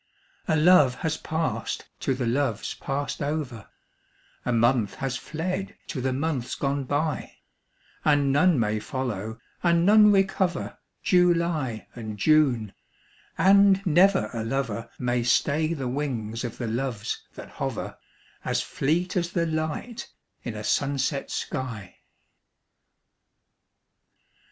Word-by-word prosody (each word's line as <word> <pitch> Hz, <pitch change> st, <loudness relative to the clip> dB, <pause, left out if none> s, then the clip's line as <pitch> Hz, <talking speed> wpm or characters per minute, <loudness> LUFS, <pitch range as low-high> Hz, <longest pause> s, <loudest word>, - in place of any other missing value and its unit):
A 160 Hz, -, +2 dB
love 150 Hz, -5 st, +6 dB
has 160 Hz, -1 st, +1 dB
passed 160 Hz, 0 st, -3 dB
to 135 Hz, -, 0 dB
the 125 Hz, -1 st, -2 dB
loves 120 Hz, -2 st, 0 dB
passed 140 Hz, +2 st, -4 dB
over, 140 Hz, -7 st, -3 dB, 0.7 s
A -, -, -1 dB
month 115 Hz, -2 st, +2 dB
has 135 Hz, -1 st, -3 dB
fled 180 Hz, +7 st, -4 dB
to 130 Hz, -, -3 dB
the 130 Hz, +1 st, 0 dB
months 135 Hz, -2 st, -2 dB
gone 140 Hz, -1 st, -1 dB
by; 145 Hz, +3 st, -2 dB, 0.7 s
And 145 Hz, -2 st, +3 dB
none 150 Hz, +1 st, +4 dB
may 110 Hz, -1 st, +1 dB
follow, 110 Hz, -2 st, -4 dB, 0.2 s
and 170 Hz, -1 st, +3 dB
none 210 Hz, +1 st, +7 dB
recover 190 Hz, -2 st, 0 dB, 0.2 s
July 170 Hz, -, +2 dB
and 110 Hz, -3 st, -7 dB
June, 125 Hz, -5 st, +3 dB, 0.6 s
and 200 Hz, 0 st, +5 dB
never 190 Hz, +4 st, +4 dB
a 115 Hz, -2 st, -3 dB
lover 115 Hz, -2 st, -2 dB
May 125 Hz, -1 st, 0 dB
stay 150 Hz, +6 st, +2 dB
the 140 Hz, -6 st, -2 dB
wings 125 Hz, -4 st, -3 dB
of 120 Hz, -2 st, -5 dB
the 120 Hz, -, -3 dB
Loves 115 Hz, -1 st, -3 dB
that -, -, -9 dB
hover, -, -, -3 dB, 0.5 s
As -, -, 0 dB
fleet 170 Hz, +6 st, -1 dB
as 175 Hz, -1 st, -1 dB
the 170 Hz, -1 st, +1 dB
light 160 Hz, +9 st, -3 dB, 0.3 s
in 120 Hz, -3 st, -5 dB
a 105 Hz, -, -6 dB
sunset 140 Hz, +3 st, 0 dB
sky. 120 Hz, -9 st, -5 dB
140 Hz, 120 wpm, -26 LUFS, 120-165 Hz, 0.7 s, none